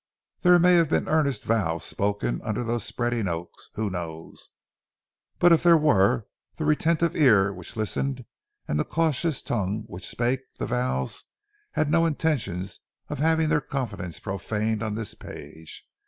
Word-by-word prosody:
There 180 -1 +6
may 180 +1 +5
have 165 -3 +3
been - - +1
earnest 145 -7 +1
vows 85 -8 0
spoken 100 -13 -1
under 110 +2 -2
those 120 0 -1
spreading 120 -4 -1
oaks—who 90 +5 -5
knows? 80 -3 -7 0.9
But 175 - +5
if 165 - +5
there 170 -1 +6
were, 115 -8 +3 0.3
the 155 - -3
retentive 165 +2 +2
ear 105 -10 +5
which 90 +4 -10
listened, 125 +4 -2 0.4
and 75 - 0
the - - +2
cautious 160 -1 0
tongue 105 -1 -1
which 90 +1 -7
spake 125 +2 0 0.2
the - - -2
vows, 125 - -2 0.5
had 155 -1 +1
no 165 0 +4
intention 135 - -1 0.4
of - - -4
having 160 +1 +2
their 160 -2 +2
confidences 115 - -5
profaned 105 +3 -2
on 110 -2 -2
this 110 -2 -5
page. 80 +2 -10
115 Hz, 150 wpm, -26 LUFS, 95-155 Hz, 0.9 s, There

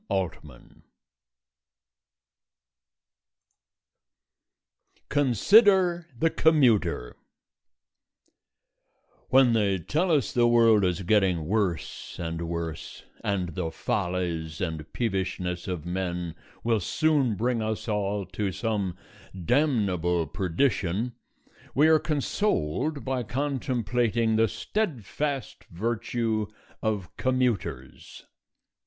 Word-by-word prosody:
CONSIDER 175 - +4
THE 165 +7 +3
COMMUTER 115 - +2 2.1
When 130 -2 +5
they 100 -4 +2
tell 155 - -1
us 150 -5 +2
the 120 -2 +3
world 115 -3 +5
is 90 0 0
getting 90 -4 +2
worse 95 -2 -2
and 85 -1 -4
worse, 85 -2 -5 0.2
and 100 -5 -1
the 85 0 -3
follies 85 -2 -2
and 80 -3 -4
peevishness 95 -5 -2
of 90 -4 -4
men 90 -2 -3 0.3
will 115 -2 +2
soon 140 - +1
bring 120 +2 0
us 110 +1 -3
all 105 -2 -1
to 95 +2 -3
some 100 -2 -2 0.5
damnable 100 - +1
perdition, 100 - -1 0.6
we 150 +3 +5
are 160 -1 +6
consoled 150 - -1
by 130 -1 -1
contemplating 120 -3 0
the 115 +1 +4
steadfast 140 - -3
virtue 110 +2 -2 0.3
of 105 -5 -2
commuters. 130 -6 -2
110 Hz, 85 wpm, -27 LUFS, 90-130 Hz, 2.1 s, are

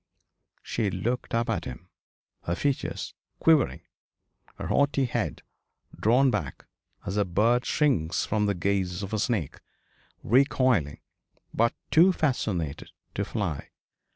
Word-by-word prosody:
She 110 -4 -1
looked 115 +7 -2
up 115 +1 +1
at 105 -8 -1
him, 60 - -8 0.6
her 85 - 0
features 140 +6 -2 0.3
quivering, 160 -5 +3 0.7
her - - -6
haughty 140 -1 +2
head 120 - -2 0.5
drawn 125 +5 +3
back; 95 - -4 0.4
as 95 - -3
a 105 - +4
bird 110 +7 +2
shrinks 95 - +1
from 105 -1 0
the 100 - +1
gaze 95 0 -1
of 100 +2 -6
a 110 - 0
snake, 105 - -1 0.6
recoiling, 125 - +2 0.5
but 115 +2 +2 0.2
too 170 +5 +7
fascinated 105 - -1 0.2
to 100 - -1
fly. 95 -9 -3
110 Hz, 125 wpm, -27 LUFS, 95-130 Hz, 0.7 s, too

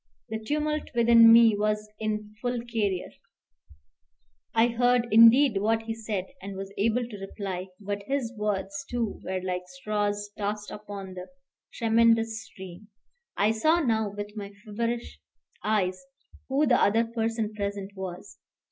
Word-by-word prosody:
The 220 0 -3
tumult 300 +4 -1
within 230 -1 +7
me 230 -2 +7
was 210 0 -1
in 215 -1 -3
full 245 -1 -1
career. 205 -6 -2 1.4
I 230 +1 +3
heard 245 0 +2
indeed 230 +1 +7
what 225 +2 +1
he 225 0 -3
said, 215 -4 -3 0.2
and 195 0 -7
was 195 0 -7
able 230 +4 +1
to 210 -4 -9
reply; 195 -1 -5
but 205 0 -4
his 270 -4 -1
words, 200 -2 -2
too, 235 -3 -3
were 185 0 -3
like 180 -1 -2
straws 205 -4 -2
tossed 205 0 -3
upon 200 -2 -8
the 180 0 -8 0.5
tremendous 225 -1 +3
stream. 190 0 -11 0.5
I 210 +2 +3
saw 310 +10 +3
now 220 -8 +1
with 205 +1 -7
my 200 -1 -6
feverish 230 +3 -3 0.4
eyes 200 0 0 0.5
who 280 +3 +2
the - - +3
other 225 +3 +3
person 225 -1 -2
present 200 -1 -4
was. 190 0 -8
215 Hz, 140 wpm, -27 LUFS, 200-230 Hz, 1.4 s, within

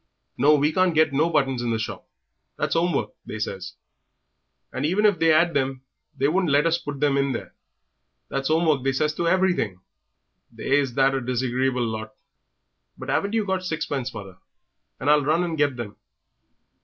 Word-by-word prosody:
"No, 150 +2 +5
we 150 +1 +2
can't 185 -3 +2
get 155 -2 +3
no 155 +5 +2
buttons 135 -6 +1
in 120 - -2
the 115 - 0
shop: 110 - -6 0.5
that's - - -1
'ome 175 +2 +2
work, 105 -9 -1
they 110 - -7
says; 95 -3 -5 1.0
and 130 - -3
even 185 +8 +2
if 205 -5 +3
they 165 0 +4
'ad 170 +2 +4
them 135 -1 -1 0.3
they 135 - +2
wouldn't 175 0 +1
let 145 +2 +4
us 165 +1 +2
put 145 -4 -6
them 145 -1 +2
in 140 -1 +1
there. - - -6 0.7
That's 135 +1 -2
'ome 160 +2 +2
work 145 -5 +2
they 135 0 +1
says 150 +3 0
to 170 +2 -2
everything; 180 - +1 0.7
they - - -6
is 135 -4 -2
a - - -17
that 135 -2 +2
disagreeable 125 0 0
lot." 110 -1 -5 0.8
"But - - -5
'aven't 200 +2 0
you 220 -2 +1
got 190 -1 -1
sixpence, 145 -7 -3
mother? 95 -4 -10 0.6
and 135 - -4
I'll 150 0 +5
run 155 +5 +2
and 170 -2 -2
get 145 -3 +1
them." 105 -4 -6
145 Hz, 190 wpm, -24 LUFS, 130-165 Hz, 1.0 s, No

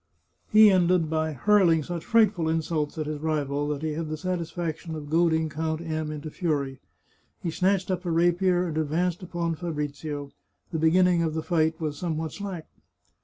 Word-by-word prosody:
He 215 -1 +8
ended 180 -3 +3
by 160 0 0
hurling 170 - +4
such 170 +1 -5
frightful 210 -8 +3
insults 160 -2 -1
at 155 - -2
his 150 0 -4
rival, 145 -2 -1
that 150 0 -3
he 155 - -1
had 155 +1 -4
the 155 - -3
satisfaction 170 -2 -3
of 150 -1 -8
goading 160 -1 +3
Count 160 +1 -2
M 155 -2 -3
into 155 0 -6
fury. 140 -6 -2 0.6
He 170 - -1
snatched 190 +2 +1
up 180 -1 -2
a 175 - -3
rapier, 175 +2 +2
and 160 -2 -2
ad 155 - 0
vanced 175 +3 0
upon 170 -2 -2
Fabrizio. 150 -3 -4 0.4
The 160 - -2
beginning 175 +2 +4
of 160 -2 -1
the 160 - -2
fight 160 -2 +1
was 150 -3 -3
somewhat 160 -3 -2
slack. 190 -6 -6
160 Hz, 175 wpm, -26 LUFS, 155-175 Hz, 0.6 s, He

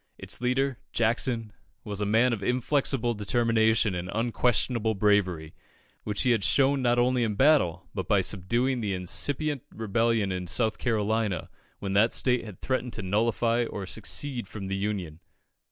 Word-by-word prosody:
Its - - -6
leader, 130 +1 0
Jackson, 115 -1 0 0.3
was 105 -2 -4
a 105 - 0
man 115 +4 +3
of 110 - -4
inflexible 125 +1 +1
determination 110 -1 +2
and 90 +1 -4
unquestionable 115 -1 0
bravery, 95 -6 +1 0.5
which 105 -1 -1
he 125 - +3
had 115 -4 +1
shown 135 +6 +3
not 120 -1 +2
only 125 0 +2
in 110 -2 -1
battle, 100 - +3
but 95 -3 -4
by 105 - +3
subduing 120 +8 0
the 100 -3 -1
incipient 140 - 0
rebellion 110 -1 0
in 90 -1 -4
South 110 +4 0
Carolina, 110 -5 -1 0.3
when 95 -1 -4
that 110 +4 +3
state 125 -2 +2
had 105 -5 -10
threatened 130 -2 -2
to 110 - -5
nullify 115 +4 +1
or 100 -3 -6
secede 120 +4 -2
from 100 -1 -7
the 95 0 -3
Union. 95 -6 -3
110 Hz, 155 wpm, -27 LUFS, 100-120 Hz, 0.5 s, man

